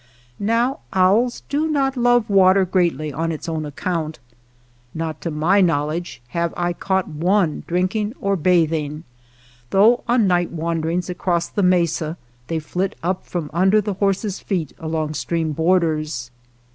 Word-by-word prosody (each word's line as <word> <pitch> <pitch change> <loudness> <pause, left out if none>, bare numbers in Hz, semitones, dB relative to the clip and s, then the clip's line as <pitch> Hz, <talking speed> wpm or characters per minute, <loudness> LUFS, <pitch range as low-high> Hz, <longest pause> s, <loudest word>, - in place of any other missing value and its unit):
Now 235 +7 +1
owls 205 +7 +3
do 300 +3 0
not 275 -3 +1
love 245 -2 +3
water 190 -1 +5
greatly 170 -5 0
on 165 +3 -1
its 155 - -6
own 160 -2 -3
account. 160 +1 -3 0.8
Not 160 -1 -4
to 170 - -3
my 165 +6 +2
knowledge 160 -3 -1
have 170 +2 -2
I 175 0 0
caught 190 +1 -1
one 170 +1 0
drinking 200 +6 -1
or 200 0 0
bathing, 160 -3 +1 0.7
though 220 +5 +4
on 240 -2 +3
night 175 -2 +2
wanderings 165 +1 -2
across 175 -1 -1
the 205 - -1
mesa 170 -3 +1 0.3
they 165 - -1
flit 180 +5 -2
up 180 +2 -2
from 165 -5 -4
under 190 +5 +4
the 205 -1 -2
horse's 195 +1 -1
feet 175 -8 -3
along 160 -1 -2
stream 160 +1 -1
borders. 155 -6 0
175 Hz, 145 wpm, -21 LUFS, 160-195 Hz, 0.8 s, water